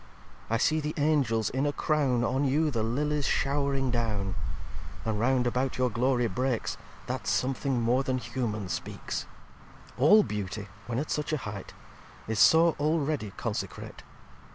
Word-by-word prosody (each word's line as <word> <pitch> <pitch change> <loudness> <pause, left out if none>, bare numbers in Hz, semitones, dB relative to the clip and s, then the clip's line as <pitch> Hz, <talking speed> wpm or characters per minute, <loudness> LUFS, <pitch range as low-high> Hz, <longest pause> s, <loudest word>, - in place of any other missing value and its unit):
I 115 - +2
see 155 +6 +2
the 150 0 -3
Angels 140 -8 +2
in 135 +3 0
a - - +1
Crown 140 -5 +1
On 130 +4 +1
you 150 +3 +2
the 115 -4 -1
Lillies 145 +5 0
show'ring 140 -2 +1
down: 105 -5 -1 0.7
And 110 -2 -1
round 125 +1 +2
about 125 +2 0
your 125 -1 +1
Glory 120 +2 +2
breaks, 125 +2 -1 0.3
That 125 -5 -4
something 130 +5 0
more 120 +3 +2
than 130 -1 -1
humane 110 -5 -3
speaks. 85 0 -4
xix - - -2 0.7
"All 205 +11 +7
Beauty, 105 - -4 0.2
when 120 -1 -2
at 145 +4 -2
such 150 +2 -1
a - - +2
height, 105 -6 -7 0.5
Is 110 -1 -1
so 165 0 +6
already 150 -7 0
consecrate. - - -4
130 Hz, 155 wpm, -28 LUFS, 115-145 Hz, 0.7 s, All